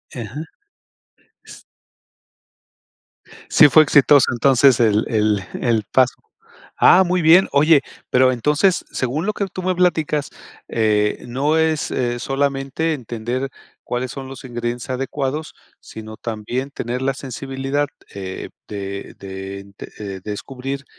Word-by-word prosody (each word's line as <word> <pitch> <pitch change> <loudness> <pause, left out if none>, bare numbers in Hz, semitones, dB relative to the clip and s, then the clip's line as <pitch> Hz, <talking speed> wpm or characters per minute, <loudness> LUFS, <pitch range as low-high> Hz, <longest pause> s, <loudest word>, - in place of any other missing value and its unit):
Ajá. 130 +7 -7 3.0
¿Sí 150 - +7
fue 155 +3 +7
exitoso 140 -2 +5
entonces 130 +1 +4
el 110 -2 +3
el 105 -3 +1 0.2
el 115 -3 +1
paso? 130 -1 +4 0.7
Ah, 190 - +8
muy 180 0 +1
bien. 170 +4 +6
Oye, 145 0 +5 0.3
pero 130 0 +4
entonces, 150 - +1
según 135 +7 -2
lo 215 - 0
que 200 - -2
tú 185 - -7
me 185 0 0
platicas, 160 -5 +1 0.4
eh, 105 -2 +1
no 140 +6 0
es, 160 -1 +1
eh, 120 -1 -1
solamente 140 +4 -1
entender 120 +1 -4 0.3
cuáles 125 +1 -3
son 135 -1 -7
los 135 -1 -10
ingredientes 120 0 -4
adecuados, 135 +3 -3 0.3
sino 110 0 -10
también 120 +4 -4
tener 125 -1 -4
la 135 0 +1
sensibilidad, 135 +2 -3 0.3
eh, 95 -1 -6 0.2
de 100 -1 -6
de, 95 +1 -8 0.3
eh, 100 -3 -6
descubrir 135 +6 -6
130 Hz, 120 wpm, -20 LUFS, 115-145 Hz, 3.0 s, Ah